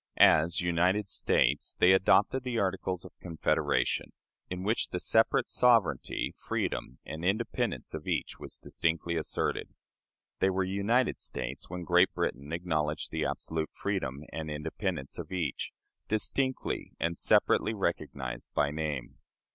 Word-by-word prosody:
As 80 Hz, +3 st, +6 dB
"United 90 Hz, +4 st, +2 dB
States" 70 Hz, +3 st, +2 dB
they 90 Hz, -, +6 dB
adopted 100 Hz, +6 st, +4 dB
the 125 Hz, -2 st, -2 dB
Articles 95 Hz, -2 st, -1 dB
of -, -, -11 dB
Confederation, 85 Hz, -3 st, 0 dB, 0.4 s
in 90 Hz, 0 st, -4 dB
which 110 Hz, +4 st, +1 dB
the -, -, -3 dB
separate -, -, +3 dB
sovereignty, 110 Hz, -, +2 dB
freedom, 65 Hz, -, -2 dB
and 80 Hz, +1 st, -6 dB
independence 105 Hz, +5 st, -1 dB
of -, -, -6 dB
each -, -, -2 dB
was -, -, -8 dB
distinctly 85 Hz, +1 st, -1 dB
asserted. 80 Hz, -2 st, -2 dB, 0.6 s
They 95 Hz, -, +4 dB
were 95 Hz, 0 st, +1 dB
"united 100 Hz, +7 st, +1 dB
States" 65 Hz, +2 st, -4 dB
when 90 Hz, 0 st, -5 dB
Great 90 Hz, +2 st, +4 dB
Britain 70 Hz, +3 st, -2 dB
acknowledged 80 Hz, -3 st, -1 dB
the -, -, -1 dB
absolute 80 Hz, -1 st, -2 dB
freedom 75 Hz, -9 st, -2 dB
and 80 Hz, -1 st, -4 dB
independence 75 Hz, 0 st, -3 dB
of -, -, -7 dB
each, 85 Hz, -8 st, -2 dB, 0.4 s
distinctly 130 Hz, +5 st, -1 dB
and 85 Hz, 0 st, 0 dB
separately 110 Hz, +5 st, +3 dB
recognized 70 Hz, -, -3 dB
by 70 Hz, -, +2 dB
name. 75 Hz, -4 st, -4 dB
85 Hz, 130 wpm, -30 LUFS, 75-95 Hz, 0.6 s, As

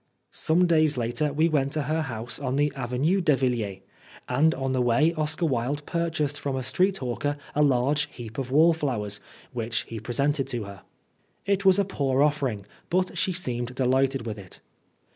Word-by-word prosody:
Some 175 Hz, +3 st, +2 dB
days 155 Hz, -4 st, +3 dB
later 125 Hz, +6 st, 0 dB
we 155 Hz, +3 st, +2 dB
went 140 Hz, -3 st, 0 dB
to 155 Hz, -, 0 dB
her 155 Hz, +3 st, 0 dB
house 120 Hz, -4 st, -4 dB
on 130 Hz, -2 st, -2 dB
the 145 Hz, +1 st, +1 dB
Avenue 135 Hz, +9 st, 0 dB
de 155 Hz, -5 st, +4 dB
Villiers, 115 Hz, -7 st, -1 dB, 0.5 s
and 160 Hz, +3 st, +3 dB
on 135 Hz, 0 st, -2 dB
the 130 Hz, -, +1 dB
way 125 Hz, +7 st, +3 dB
Oscar 155 Hz, +1 st, 0 dB
Wilde 140 Hz, +1 st, -1 dB
purchased 165 Hz, -4 st, -1 dB
from 140 Hz, -2 st, -2 dB
a 130 Hz, -, -2 dB
street 185 Hz, +8 st, +2 dB
hawker 135 Hz, +3 st, -2 dB, 0.2 s
a 150 Hz, -, +1 dB
large 140 Hz, +1 st, +2 dB
heap 115 Hz, 0 st, -8 dB
of 130 Hz, -2 st, -3 dB
wallflowers, 135 Hz, -9 st, +2 dB, 0.3 s
which 115 Hz, -1 st, -1 dB
he 115 Hz, -, -7 dB
presented 135 Hz, +5 st, 0 dB
to 120 Hz, -3 st, -3 dB
her. 100 Hz, -2 st, -10 dB, 0.6 s
It 200 Hz, 0 st, 0 dB
was 190 Hz, 0 st, +6 dB
a 200 Hz, -, +2 dB
poor 140 Hz, -7 st, +1 dB
offering, 135 Hz, -9 st, 0 dB, 0.2 s
but 185 Hz, +1 st, 0 dB
she 190 Hz, -, 0 dB
seemed 125 Hz, -8 st, -3 dB
delighted 130 Hz, 0 st, +1 dB
with 110 Hz, -2 st, -5 dB
it. 95 Hz, -2 st, -11 dB
140 Hz, 180 wpm, -26 LUFS, 120-155 Hz, 0.6 s, was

